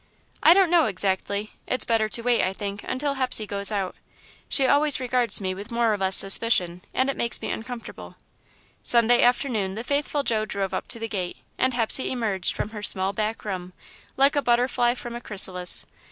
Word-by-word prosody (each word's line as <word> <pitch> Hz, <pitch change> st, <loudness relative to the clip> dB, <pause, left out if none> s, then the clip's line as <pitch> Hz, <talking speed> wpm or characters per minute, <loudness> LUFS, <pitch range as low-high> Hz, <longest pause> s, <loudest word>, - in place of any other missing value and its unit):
"I 335 Hz, -, +6 dB
don't 375 Hz, -3 st, +3 dB
know 340 Hz, -2 st, +4 dB
exactly. 200 Hz, +1 st, -1 dB, 0.2 s
It's 255 Hz, -, -2 dB
better 225 Hz, -2 st, 0 dB
to 230 Hz, -, -2 dB
wait, 245 Hz, -1 st, +2 dB
I 185 Hz, -, -1 dB
think, 200 Hz, +1 st, -6 dB
until 280 Hz, +2 st, -2 dB
Hepsey 255 Hz, -5 st, 0 dB
goes 200 Hz, 0 st, +1 dB
out. 195 Hz, -3 st, -3 dB, 0.5 s
She 275 Hz, -, +3 dB
always 285 Hz, +1 st, +3 dB
regards 250 Hz, -3 st, +1 dB
me 190 Hz, -2 st, -3 dB
with 200 Hz, +3 st, -10 dB
more 235 Hz, -2 st, +1 dB
or -, -, -2 dB
less 190 Hz, 0 st, +3 dB
suspicion, 190 Hz, -4 st, +2 dB
and 260 Hz, -, 0 dB
it 275 Hz, -, -2 dB
makes 235 Hz, -, -1 dB
me -, -, -5 dB
uncomfortable." 235 Hz, +1 st, -8 dB, 0.7 s
Sunday 240 Hz, 0 st, +4 dB
afternoon, 240 Hz, -6 st, 0 dB
the 225 Hz, -, -5 dB
faithful 285 Hz, +2 st, -1 dB
Joe 220 Hz, -5 st, 0 dB
drove 195 Hz, -3 st, -4 dB
up -, -, -4 dB
to -, -, -3 dB
the 225 Hz, 0 st, -5 dB
gate, 185 Hz, -5 st, -5 dB, 0.2 s
and 260 Hz, -1 st, +1 dB
Hepsey 240 Hz, +2 st, +1 dB
emerged 210 Hz, -7 st, -1 dB
from -, -, -4 dB
her 215 Hz, -2 st, -8 dB
small 190 Hz, -1 st, +2 dB
back 215 Hz, +2 st, -4 dB
room, 185 Hz, -3 st, -6 dB, 0.4 s
like 275 Hz, +2 st, +4 dB
a 285 Hz, -, +2 dB
butterfly 240 Hz, -1 st, +1 dB
from 240 Hz, -1 st, -8 dB
a 240 Hz, -, -7 dB
chrysalis. 185 Hz, -4 st, +4 dB
225 Hz, 195 wpm, -24 LUFS, 200-250 Hz, 0.7 s, I